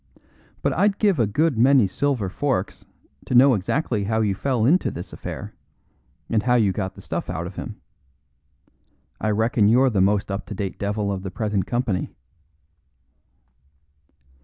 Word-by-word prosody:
But - - +1
I'd 200 +2 +2
give 200 -8 +2
a 115 - +3
good 145 +3 +1
many 130 -1 +5
silver 125 +1 -1
forks 110 0 -2 0.4
to 125 - -1
know 130 +2 +7
exactly 105 - -1
how 110 +2 0
you 105 -3 +1
fell 120 +2 0
into 170 +9 +3
this 85 - -8
affair, - - -7 0.7
and 110 -2 +1
how 125 +2 +2
you 110 -5 +3
got 95 -1 -4
the - - -12
stuff - - -4
out 85 - -3
of 90 +1 -8
him. - - -7 1.4
I 110 - -1
reckon 110 0 +2
you're 125 +4 +4
the 100 -4 +1
most 100 +1 +1
up 100 - -4
to 105 - -6
date 95 -1 -4
devil 100 0 -1
of 95 -1 -3
the 95 - -5
present 105 -2 -2
company." 120 -6 -2
110 Hz, 160 wpm, -23 LUFS, 100-130 Hz, 1.4 s, know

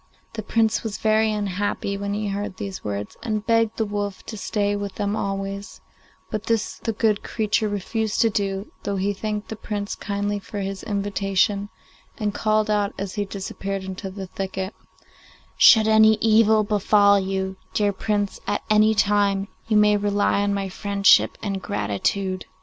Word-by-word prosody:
The 225 - -4
Prince 220 +1 +1
was 220 -3 -4
very 220 0 +2
unhappy 205 -1 -2
when 200 0 -3
he 210 0 -2
heard 200 -1 -4
these 195 -2 -6
words, 100 0 -4
and 215 -2 -2
begged 230 -1 +2
the 220 - +1
wolf 205 -1 -4
to 220 - -7
stay 205 0 -1
with 200 -1 -4
them 205 0 -1
always; 195 0 -4 0.5
but 215 -1 -3
this 225 -2 -1
the 225 - -2
good 215 -1 +1
creature 215 -1 0
refused 215 +2 -2
to 225 - +3
do, 195 0 -2
though 200 - -2
he 195 +1 0
thanked 210 +1 -4
the 220 - -4
Prince 205 -1 -4
kindly 205 0 -2
for 205 +1 -8
his 195 0 -4
invitation, 200 0 0 0.5
and 210 -3 -1
called 215 0 +1
out 205 -1 0
as 195 -1 -4
he 205 -1 -2
disappeared 195 0 -5
into 190 0 -6
the 190 0 -7
thicket, 190 +1 -4 0.8
'Should 220 -1 +7
any 220 0 +6
evil 220 0 +4
befall 205 -1 +4
you, 190 0 -2 0.2
dear 205 -1 +2
Prince, 205 0 -1
at 205 - -1
any 215 +1 +5
time, 200 -1 +2 0.2
you 215 -2 +3
may 210 0 +5
rely 205 0 +1
on 205 0 +1
my 200 -1 -1
friendship 200 +1 +3
and 195 -2 -2
gratitude. 185 - -2
205 Hz, 165 wpm, -23 LUFS, 195-215 Hz, 0.8 s, Should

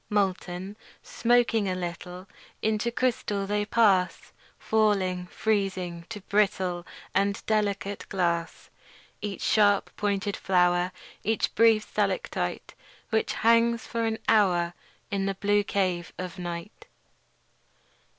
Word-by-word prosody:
Molten, 190 -1 -1 0.3
smoking 230 -3 +2
a 185 - -1
little, 180 +1 -6 0.4
Into 220 +2 +1
crystal 230 -5 -1
they 205 +1 0
pass; 200 -5 +2 0.3
Falling, 195 -5 +1
freezing, 185 -5 -2
to 210 -3 -6
brittle 190 -3 0 0.3
And 200 +1 0
delicate 205 -2 -1
glass. 170 -3 -2 0.5
Each 205 -2 -4
a - - +1
sharp 205 -2 +3
pointed 205 -1 -1
flower, 180 -1 +2 0.3
Each 220 0 +1
a - - -29
brief 225 -1 +4
stalactite - - -2 0.4
Which 220 0 +1
hangs 230 0 +3
for 230 -1 -2
an 220 0 -1
hour 180 -6 +3 0.4
In 195 -1 0
the 195 - -1
blue 205 +1 +2
cave 185 -4 -1
of 185 0 -6
night. 175 +2 -7
200 Hz, 115 wpm, -27 LUFS, 180-215 Hz, 0.5 s, brief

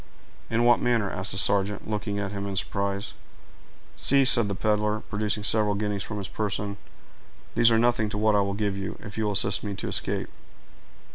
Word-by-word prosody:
"In 115 +1 +1
what 120 0 +5
manner?" 115 -5 +1
asked 95 +2 -3
the 95 - -4
sergeant, 100 +1 +2
looking 105 -1 -3
at 100 -1 -3
him 100 -1 -4
in 100 - -4
surprise. 100 +1 -2 0.8
"See," 140 0 +3
said 120 -4 +6
the 100 - -3
peddler, 105 +1 0
producing 105 0 -3
several 105 -1 +2
guineas 105 -1 -2
from 105 0 -5
his 100 -2 -4
person; 100 -1 -3 0.8
"these 115 - +5
are 115 - +3
nothing 115 -2 +2
to 105 - -4
what 110 0 +2
I 100 - +4
will 100 0 -2
give 100 -1 -1
you, 100 0 -5
if 105 -1 -9
you 110 - -1
will 105 - 0
assist 100 0 +2
me 100 -2 -4
to - - -5
escape." - - -2
105 Hz, 200 wpm, -26 LUFS, 100-110 Hz, 0.8 s, said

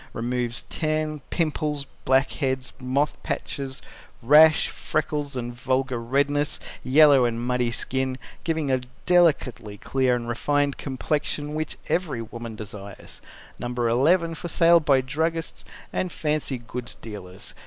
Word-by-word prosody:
Removes 120 0 -2
Tan, 155 -1 -1
Pimples, 150 -3 -1 0.2
Blackheads, 130 0 +1
Moth 135 +3 0
Patches, 135 -1 -4 0.4
Rash, 150 +5 +7
Freckles 150 -2 -2
and 120 -1 -4
Vulgar 130 0 -1
Redness, 145 +4 +1 0.2
Yellow 140 -1 +6
and 115 -1 -1
Muddy 125 0 0
Skin, 130 +2 -2 0.3
giving 160 -4 0
a 130 -1 +2 0.2
delicately 145 - +2
clear 130 +3 +1
and 120 -1 -4
refined 145 +4 0
complexion 145 +2 -2
which 155 0 -3
every 155 -10 -1
woman 115 0 -7
desires. 105 -2 -8 0.4
No. 120 - -3
11. 130 +9 +2
For 170 - -6
sale 170 +1 +5
by 140 -4 +3
Druggists 160 +5 -2 0.3
and 185 - -1
Fancy 150 -4 -1
Goods 120 0 -7
Dealers. 95 -4 -8
135 Hz, 120 wpm, -25 LUFS, 120-150 Hz, 0.4 s, Rash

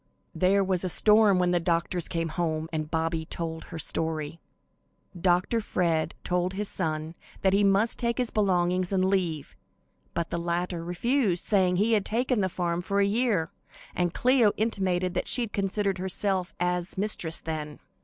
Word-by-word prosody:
There 195 +2 +3
was 185 -2 +1
a 185 - -1
storm 210 +1 +5
when 180 -1 +2
the 175 - +2
doctors 170 0 -1
came 165 -1 -2
home 160 -1 -2
and 155 -1 -2
Bobby 160 0 -1
told 160 0 -5
her 165 - -8
story. 160 -1 -3 0.8
Dr. 180 +6 +1
Fred 165 -5 0
told 180 +1 0
his 205 +2 -3
son 155 -3 -3 0.3
that 190 -1 +3
he 200 +1 +3
must 200 +3 +3
take 235 -1 0
his 250 -3 0
belongings 185 -3 +1
and 185 -1 +2
leave, 180 -6 -1 0.6
but 170 -1 -2
the 170 - -1
latter 170 0 -2
refused, 185 +2 0
saying 185 -3 +2
he 215 +5 +2
had 210 -3 +3
taken 245 0 0
the 190 - +1
farm 175 -1 -2
for 200 +2 -1
a 200 - +4
year; 205 -5 +1 0.4
and 175 -1 0
Cleo 245 0 +3
intimated 185 -5 0
that - - -2
she 245 -2 +2
considered 200 -1 -1
herself 190 0 0
as 180 +1 -1
mistress 190 -5 -1
then. 155 -2 -5
180 Hz, 165 wpm, -27 LUFS, 170-200 Hz, 0.8 s, storm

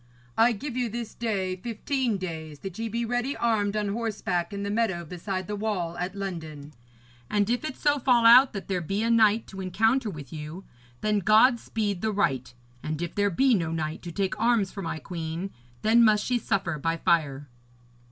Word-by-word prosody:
I 230 +2 +5
give 255 +4 -6
you 250 -2 0
this 230 0 -5
day 195 -5 -2
fifteen 235 +2 -1
days, 160 -5 -6
that 195 0 -7
ye 225 0 -2
be 235 +2 -2
ready 245 +4 -1
armed 215 -3 +1
on 210 -1 -1
horseback 205 -5 -2
in 200 0 -4
the 200 - -2
meadow 205 -6 0
beside 185 +3 -4
the 210 - -4
wall 200 -5 -2
at 180 +2 -3
London; 160 -7 -6 0.6
and 205 -1 +2
if 245 - 0
it 310 -4 -4
so 290 -1 +2
fall 245 -2 +3
out 250 +3 +8
that 200 - -6
there 185 -2 -1
be 195 +6 -2
a 230 - +2
knight 220 -1 +4
to 195 -1 -8
encounter 225 +6 +1
with 150 -7 -9
you, 155 +4 -7 0.4
then 210 -1 +2
God 220 +5 +5
speed 205 -6 -2
the 220 - 0
right; 135 -12 0 0.3
and 155 0 -4
if 175 0 -4
there 205 0 +2
be 260 +8 +3
no 165 -6 0
knight 155 -1 -3
to 175 - -7
take 200 +3 -2
arms 230 -5 +2
for 200 - -6
my 165 -3 -3
queen, 170 +2 -5 0.3
then 230 +2 +5
must 215 -2 +4
she 245 -1 +1
suffer 185 -8 -1
by 165 +3 0
fire.' 145 -4 +1
200 Hz, 200 wpm, -27 LUFS, 170-230 Hz, 0.6 s, out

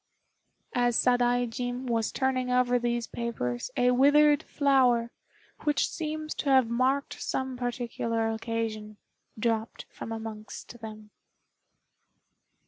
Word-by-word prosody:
As 245 -1 +2
Sadaijin 245 0 +1
was 230 -3 0
turning 260 -1 0
over 250 0 +3
these 240 -1 -1
papers 125 - -3
a 250 0 +4
withered 290 +3 +5
flower, 255 -5 +2 0.5
which 295 -1 +2
seems 310 -1 -4
to 285 - -1
have 260 -3 +5
marked 255 +4 0
some 260 -1 -2
particular 235 -2 -2
occasion, 220 -2 -4 0.4
dropped 225 0 -1
from - - -8
amongst 225 +1 -7
them. 215 -1 -9
245 Hz, 105 wpm, -28 LUFS, 225-260 Hz, 0.5 s, withered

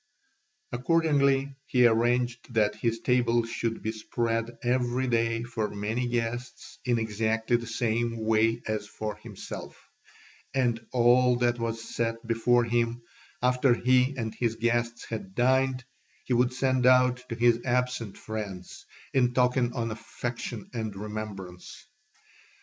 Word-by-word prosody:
Accordingly 140 -1 +2
he 125 -2 +4
arranged 120 +1 +1
that 105 -1 +3
his 115 +2 -2
table 120 -1 +2
should 115 0 -3
be 110 - -1
spread 115 +1 -2
every 125 +1 +1
day 115 -1 +1
for 115 -3 -3
many 110 +5 -2
guests 120 +1 -4
in 120 -2 +2
exactly 110 +1 0
the 120 -1 -2
same 115 0 -1
way 110 +1 +2
as 110 -1 -2
for 105 0 -5
himself; 105 -2 -9 0.8
and 120 -3 +1
all 125 +1 +4
that 120 0 +1
was 115 0 -3
set 115 0 -2
before 120 +1 +3
him, 115 0 0 0.4
after 125 0 +4
he 130 +2 +2
and 110 -3 -3
his 115 -2 -1
guests 120 +1 -1
had 95 -4 -6
dined, 130 0 +2 0.4
he 130 - 0
would 125 +1 +3
send 130 -1 +1
out 125 -1 +4
to 115 - -3
his 120 0 +4
absent 125 -4 -1
friends, 105 -4 -7 0.3
in 125 -2 +2
token 125 -1 +2
of 115 -3 -2
affection 115 0 -5
and 110 -4 -3
remembrance. 100 -3 -7
120 Hz, 135 wpm, -28 LUFS, 115-125 Hz, 0.8 s, he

